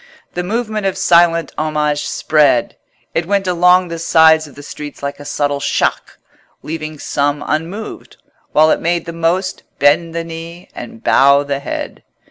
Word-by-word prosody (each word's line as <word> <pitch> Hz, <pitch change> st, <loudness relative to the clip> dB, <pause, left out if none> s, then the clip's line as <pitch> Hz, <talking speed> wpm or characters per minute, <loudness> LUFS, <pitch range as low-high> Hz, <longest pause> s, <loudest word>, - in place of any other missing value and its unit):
The 180 Hz, -, -2 dB
movement 215 Hz, +1 st, -2 dB
of 190 Hz, -, -2 dB
silent 170 Hz, -1 st, +3 dB
homage 150 Hz, -1 st, -1 dB
spread: 150 Hz, -6 st, +2 dB, 0.4 s
it 165 Hz, 0 st, -1 dB
went 200 Hz, 0 st, +1 dB
along 180 Hz, 0 st, +3 dB
the 165 Hz, 0 st, -5 dB
sides 160 Hz, -1 st, +4 dB
of 145 Hz, -, -16 dB
the 145 Hz, -, -11 dB
streets 145 Hz, 0 st, -9 dB
like 140 Hz, 0 st, -4 dB
a 145 Hz, -, -10 dB
subtle 145 Hz, 0 st, -1 dB
shock, 140 Hz, -, -1 dB, 0.5 s
leaving 155 Hz, -1 st, -5 dB
some 145 Hz, 0 st, -1 dB
unmoved, 170 Hz, +8 st, -5 dB, 0.3 s
while 155 Hz, +1 st, +4 dB
it -, -, +1 dB
made 170 Hz, 0 st, 0 dB
the 170 Hz, -, -6 dB
most 170 Hz, +3 st, -1 dB, 0.2 s
bend 165 Hz, +4 st, +2 dB
the 170 Hz, -, -2 dB
knee 165 Hz, +2 st, -9 dB
and 230 Hz, 0 st, -10 dB
bow 140 Hz, +1 st, +5 dB
the 140 Hz, -1 st, -3 dB
head. 140 Hz, -, -6 dB
165 Hz, 160 wpm, -16 LUFS, 145-175 Hz, 0.5 s, bow